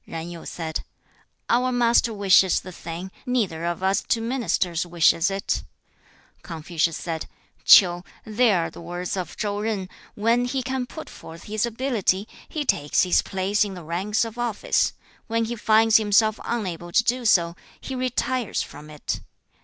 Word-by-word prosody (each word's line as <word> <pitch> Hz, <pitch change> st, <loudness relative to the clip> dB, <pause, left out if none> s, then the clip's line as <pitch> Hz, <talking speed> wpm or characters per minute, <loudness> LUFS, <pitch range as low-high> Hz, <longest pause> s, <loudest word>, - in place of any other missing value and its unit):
5. -, -, -12 dB
Zan 165 Hz, +1 st, -5 dB
Yu 170 Hz, -1 st, -9 dB
said, 160 Hz, -2 st, -4 dB, 0.6 s
'Our 250 Hz, +2 st, +2 dB
master 240 Hz, -1 st, +3 dB
wishes 195 Hz, -3 st, +4 dB
the 185 Hz, -, -10 dB
thing; 170 Hz, +2 st, -7 dB, 0.2 s
neither 200 Hz, -10 st, 0 dB
of 175 Hz, +1 st, -3 dB
us 190 Hz, +1 st, +2 dB
two 230 Hz, -, 0 dB
ministers 220 Hz, -8 st, -1 dB
wishes 170 Hz, 0 st, +3 dB
it.' 195 Hz, 0 st, -3 dB
6. -, -, -9 dB, 0.8 s
Confucius 165 Hz, 0 st, -2 dB
said, 165 Hz, -2 st, -4 dB, 0.4 s
'Ch'iu, 175 Hz, -2 st, +7 dB, 0.2 s
there 215 Hz, -5 st, +2 dB
are -, -, -4 dB
the -, -, -11 dB
words 175 Hz, +2 st, -4 dB
of 185 Hz, -4 st, -5 dB
Chau 205 Hz, -1 st, -2 dB
Zan, 210 Hz, -4 st, -2 dB, 0.3 s
"When 230 Hz, +3 st, +2 dB
he 260 Hz, +1 st, -2 dB
can 260 Hz, 0 st, -2 dB
put 315 Hz, +5 st, -9 dB
forth 165 Hz, +1 st, -11 dB
his 215 Hz, +2 st, -1 dB
ability, 225 Hz, -5 st, 0 dB, 0.2 s
he 300 Hz, -2 st, -3 dB
takes 145 Hz, -, +2 dB
his 180 Hz, -, +3 dB
place 195 Hz, +2 st, 0 dB
in 200 Hz, -2 st, -5 dB
the 175 Hz, -, -9 dB
ranks 190 Hz, +8 st, -1 dB
of 230 Hz, +1 st, -8 dB
office; 235 Hz, -4 st, 0 dB, 0.3 s
when 230 Hz, 0 st, 0 dB
he 235 Hz, +2 st, -4 dB
finds 220 Hz, 0 st, +5 dB
himself 215 Hz, 0 st, +3 dB
unable 180 Hz, -7 st, -3 dB
to 230 Hz, -, +4 dB
do 245 Hz, +2 st, 0 dB
so, 170 Hz, -6 st, +3 dB, 0.2 s
he 265 Hz, -, -7 dB
retires 255 Hz, -2 st, -1 dB
from 150 Hz, +1 st, -12 dB
it. 150 Hz, -1 st, -4 dB
205 Hz, 170 wpm, -24 LUFS, 175-235 Hz, 0.8 s, Ch'iu